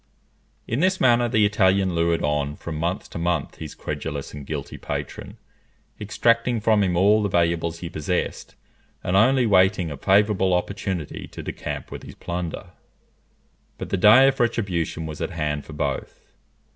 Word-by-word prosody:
In 115 - -1
this 185 +3 +2
manner 120 -1 +4
the 110 -2 +3
Italian 95 -2 +2
lured 85 0 +1
on 75 0 -1
from 80 +1 -7
month 85 +3 -2
to - - -5
month 85 -3 -1
his 75 - -8
credulous 70 -3 -5
and 75 -2 -9
guilty - - -5
patron, - - -6 0.6
extracting 115 +3 +1
from 110 -1 +3
him 90 -3 0
all 105 +4 +4
the 100 - 0
valuables 85 -1 0
he 85 - -4
possessed, 80 +3 -3 0.5
and 90 - 0
only 125 +5 +4
waiting 95 -4 +3
a 70 - -6
favourable 95 0 +3
opportunity 90 -3 -3
to - - -9
decamp - - -6
with - - -7
his - - -11
plunder. 85 -1 -5 1.1
But - - -6
the - - +2
day 110 +8 +7
of 135 0 +1
retribution 90 -9 -1
was 75 -1 -7
at - - -1
hand 75 -3 -3
for 80 - -10
both. 70 -2 -3
90 Hz, 160 wpm, -23 LUFS, 80-105 Hz, 1.1 s, day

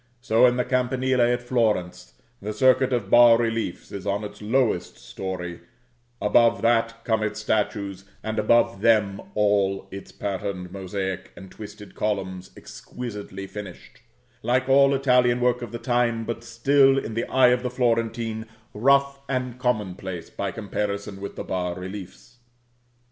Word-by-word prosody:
So 120 -1 +4
in 125 0 +1
the 125 - 0
campanile 130 0 +1
at 120 +1 +2
Florence, 105 -8 -1 0.3
the 105 +2 -4
circuit 130 +3 +3
of 115 -6 -1
bas 120 -1 +7
reliefs 115 -5 -2
is 100 0 -6
on 100 +1 -1
its 105 - -8
lowest 110 -3 0
story; 90 -2 -6 0.6
above 115 +3 +3
that 115 0 +1
come 110 -2 +1
its 110 0 -2
statues; 100 -3 -1 0.2
and 110 0 -2
above 115 -1 +3
them 105 -3 +3
all 100 -2 +1
its 100 0 -9
pattern 100 -2 -4
mosaic, 95 -1 -4
and 95 -1 -12
twisted 105 -1 -11
columns, 95 -3 -3
exquisitely 105 -5 -8
finished, 100 -2 -10 0.4
like 130 +2 +1
all 140 +1 +5
Italian 125 -2 +3
work 125 0 +1
of 120 - -6
the 120 - -4
time, 120 -2 0
but 115 0 -5
still, 135 +4 +3
in 115 -4 -3
the 115 - -1
eye 130 -1 +5
of 125 0 +2
the 125 - -2
Florentine, 115 -2 -1 0.3
rough 140 +4 +3
and 125 -2 -2
commonplace 95 -8 -3
by 100 - -3
comparison 100 -1 -4
with 100 - -6
the - - -5
bas 90 -1 -3
reliefs. 95 +5 -9
110 Hz, 150 wpm, -24 LUFS, 100-125 Hz, 0.6 s, bas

